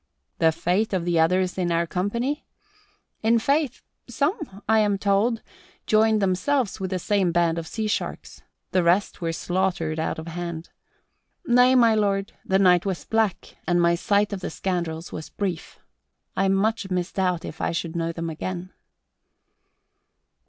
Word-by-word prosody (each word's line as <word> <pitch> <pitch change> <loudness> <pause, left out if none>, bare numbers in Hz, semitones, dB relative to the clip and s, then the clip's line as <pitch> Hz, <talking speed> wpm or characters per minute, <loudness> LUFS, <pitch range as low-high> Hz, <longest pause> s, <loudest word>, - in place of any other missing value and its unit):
The 160 -1 +5
fate 185 +7 0
of 180 -3 0
the 170 -2 +2
others 180 +3 +2
in 175 -1 0
our 170 0 +2
company? 235 - -2 0.7
In 225 +1 +4
faith, 280 +2 0 0.3
some, 280 - -2
I 220 0 +4
am 205 -2 +2
told, 205 +4 +1 0.4
joined 220 -1 +3
themselves 200 +6 0
with 190 -1 -3
that 185 - -1
same 195 -3 +1
band 170 -1 +2
of 165 - -7
sea 220 +4 -3
sharks. 210 - -3 0.3
The 185 - +3
rest 175 +4 +1
were 165 -1 -1
slaughtered 175 -2 -1
out 160 - -2
of 160 - -6
hand. 170 -1 -6 0.7
Nay, 250 -1 +5
my 230 -3 +6
lord, 200 -2 0
the 190 - +2
night 180 -2 +5
was 190 -3 -3
black 220 -4 -1
and 175 0 +3
my 170 0 +4
sight 205 +4 +1
of 200 - -3
the - - -4
scoundrels 170 -2 -3
was 155 - -7
brief. 185 -5 -4 0.6
I 195 - +2
much 195 +2 +1
misdoubt 180 -1 -1
if 155 - -8
I - - 0
should 165 0 -3
know 165 0 -1
them 165 0 -4
again." 185 +3 -5
190 Hz, 160 wpm, -24 LUFS, 170-215 Hz, 0.7 s, my